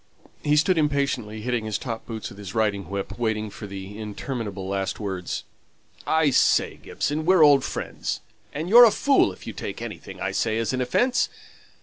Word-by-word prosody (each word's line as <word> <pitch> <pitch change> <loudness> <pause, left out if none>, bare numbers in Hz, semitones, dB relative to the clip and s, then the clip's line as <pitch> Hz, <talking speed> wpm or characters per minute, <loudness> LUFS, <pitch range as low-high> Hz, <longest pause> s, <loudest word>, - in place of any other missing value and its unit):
He 150 0 +2
stood 165 +3 +3
impatiently 140 -8 0
hitting 120 -1 -1
his 110 -1 -1
top 115 -1 -6
boots 110 -2 -5
with 100 - -13
his 100 0 -8
riding 100 -5 0
whip, 100 +2 -5
waiting 110 -2 -1
for 105 - -8
the 100 +1 -8
interminable 105 -2 -5
last 95 0 -2
words. 95 -4 -4 0.6
"I 160 -2 +3
say, - - +3
Gibson, 150 +2 -2
we're 180 0 +5
old 140 -3 +6
friends, - - -4 0.3
and 155 +4 -4
you're 235 +5 +9
a - - +7
fool 270 - +3
if - - -13
you - - -5
take - - -6
anything - - -8
I - - -2
say 110 -1 0
as 115 +2 -1
an 130 - 0
offence. 245 - +2
110 Hz, 185 wpm, -25 LUFS, 100-145 Hz, 0.6 s, you're